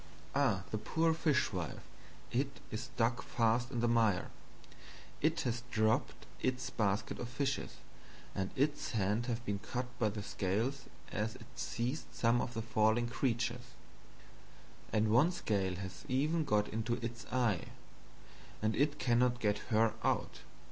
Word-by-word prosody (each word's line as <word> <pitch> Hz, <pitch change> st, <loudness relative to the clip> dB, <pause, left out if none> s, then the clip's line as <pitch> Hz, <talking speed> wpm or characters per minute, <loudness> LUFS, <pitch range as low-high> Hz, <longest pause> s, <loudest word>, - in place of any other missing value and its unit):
Ah 130 Hz, -10 st, +2 dB
the 110 Hz, -, -1 dB
poor 160 Hz, +9 st, +2 dB
Fishwife, 130 Hz, -, 0 dB, 0.5 s
it 135 Hz, +2 st, -1 dB
is 110 Hz, +2 st, -3 dB
stuck 120 Hz, -2 st, 0 dB
fast 115 Hz, +1 st, +1 dB
in 120 Hz, -, -2 dB
the 120 Hz, -, +3 dB
Mire; 110 Hz, -5 st, +3 dB, 0.9 s
it -, -, +2 dB
has 120 Hz, 0 st, -1 dB
dropped 110 Hz, -2 st, +1 dB, 0.2 s
its 130 Hz, 0 st, -1 dB
Basket 105 Hz, -1 st, 0 dB
of 120 Hz, -, -4 dB
Fishes; 135 Hz, +1 st, -1 dB, 0.6 s
and 95 Hz, -1 st, -1 dB
its 145 Hz, +1 st, 0 dB
Hands 105 Hz, +3 st, +1 dB
have 120 Hz, -1 st, -2 dB
been 100 Hz, -1 st, -1 dB
cut 125 Hz, +4 st, -3 dB
by 110 Hz, -3 st, +3 dB
the 105 Hz, 0 st, -5 dB
Scales 115 Hz, +9 st, -1 dB, 0.3 s
as 110 Hz, +1 st, -1 dB
it 115 Hz, -, -11 dB
seized 125 Hz, +6 st, -2 dB
some 115 Hz, +1 st, +3 dB
of 125 Hz, -, -4 dB
the 115 Hz, -, -2 dB
falling 110 Hz, +1 st, +2 dB
Creatures; 120 Hz, 0 st, -1 dB, 1.2 s
and 110 Hz, 0 st, +2 dB
one 145 Hz, +10 st, +5 dB
Scale 95 Hz, -, 0 dB
has 95 Hz, 0 st, -7 dB
even 150 Hz, +5 st, +1 dB
got 105 Hz, -5 st, +2 dB
into 115 Hz, +2 st, -1 dB
its 115 Hz, 0 st, -5 dB
Eye, 120 Hz, -8 st, +2 dB, 0.9 s
and 110 Hz, 0 st, +1 dB
it 145 Hz, +3 st, +2 dB
cannot 120 Hz, -1 st, +3 dB
get 105 Hz, -3 st, +1 dB
her 110 Hz, 0 st, +4 dB
out. -, -, 0 dB
120 Hz, 145 wpm, -35 LUFS, 110-125 Hz, 1.2 s, one